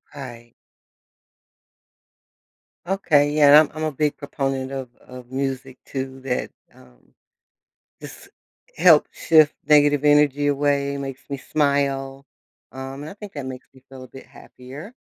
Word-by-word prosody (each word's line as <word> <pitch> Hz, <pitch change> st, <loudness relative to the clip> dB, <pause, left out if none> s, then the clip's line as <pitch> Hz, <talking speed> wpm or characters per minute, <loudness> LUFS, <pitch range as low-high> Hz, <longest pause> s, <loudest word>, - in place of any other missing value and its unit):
Right. 120 Hz, -4 st, -10 dB, 2.3 s
Okay 155 Hz, -6 st, +2 dB
yeah, 150 Hz, -1 st, +4 dB
and 150 Hz, +1 st, +7 dB
I'm 155 Hz, -, -14 dB
I'm 155 Hz, -, -3 dB
a 155 Hz, -, -1 dB
big 150 Hz, +1 st, -1 dB
proponent 135 Hz, -2 st, -3 dB
of 135 Hz, -2 st, -5 dB
of 125 Hz, -1 st, -13 dB
music 135 Hz, -1 st, -4 dB
too 135 Hz, -1 st, -6 dB
that, 130 Hz, -2 st, -3 dB, 0.2 s
um, -, -, -22 dB, 0.9 s
just -, -, -12 dB, 0.5 s
help 165 Hz, -2 st, +6 dB
shift 155 Hz, -2 st, +4 dB
negative 145 Hz, -1 st, +4 dB
energy 145 Hz, -1 st, +3 dB
away, 140 Hz, 0 st, 0 dB
makes 135 Hz, -1 st, -7 dB
me 140 Hz, -, -3 dB
smile, 140 Hz, -1 st, -1 dB, 0.5 s
um, 135 Hz, +2 st, -8 dB
and 150 Hz, -, -7 dB
I -, -, -9 dB
think 205 Hz, -1 st, -11 dB
that 145 Hz, -3 st, -6 dB
makes 130 Hz, -1 st, -8 dB
me 130 Hz, -1 st, -20 dB
feel 130 Hz, -1 st, -11 dB
a -, -, -12 dB
bit 135 Hz, -, -13 dB
happier, 140 Hz, -, -12 dB
140 Hz, 140 wpm, -22 LUFS, 130-145 Hz, 2.3 s, and